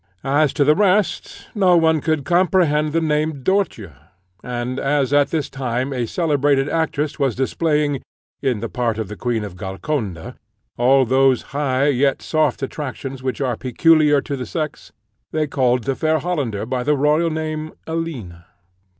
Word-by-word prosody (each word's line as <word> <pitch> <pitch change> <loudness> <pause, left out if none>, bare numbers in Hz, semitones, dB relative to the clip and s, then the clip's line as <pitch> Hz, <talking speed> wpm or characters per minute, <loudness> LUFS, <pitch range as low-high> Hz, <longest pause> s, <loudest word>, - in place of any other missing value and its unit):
As 140 +1 +2
to 145 - +2
the 150 +2 +5
rest, 205 +3 0
no 185 -5 +4
one 160 -2 +3
could 155 -3 -1
comprehend 170 -4 +2
the 165 - +1
name 150 -2 -1
"Dörtje;" 190 - 0 0.5
and 125 +1 -3
as 140 -1 0
at 145 -1 +4
this 155 -3 -1
time 130 0 -3
a 120 -3 -2
celebrated 145 -3 +1
actress 155 -2 -1
was 135 -5 +1
displaying, 145 +1 0 0.4
in 125 -6 0
the 115 - -2
part 120 -2 -2
of 110 -3 -4
the 105 - -6
Queen 120 -1 -2
of 100 -4 -7
Golconda, 95 - -4 0.4
all 130 +2 +4
those 130 0 +3
high 140 -1 +1
yet 135 0 +1
soft 155 -3 0
attractions 135 -1 -5
which 130 0 -3
are 125 -3 0
peculiar 150 +4 +3
to 140 - -4
the 125 -3 -6
sex, 155 +1 -5 0.4
they 155 -1 0
called 125 -4 +1
the 135 - 0
fair 155 +3 +1
Hollander 145 - -2
by 125 +1 -2
the 145 +3 +1
royal 150 +4 +2
name, 155 0 -4
Alina. 125 - -5
140 Hz, 160 wpm, -20 LUFS, 125-155 Hz, 0.5 s, the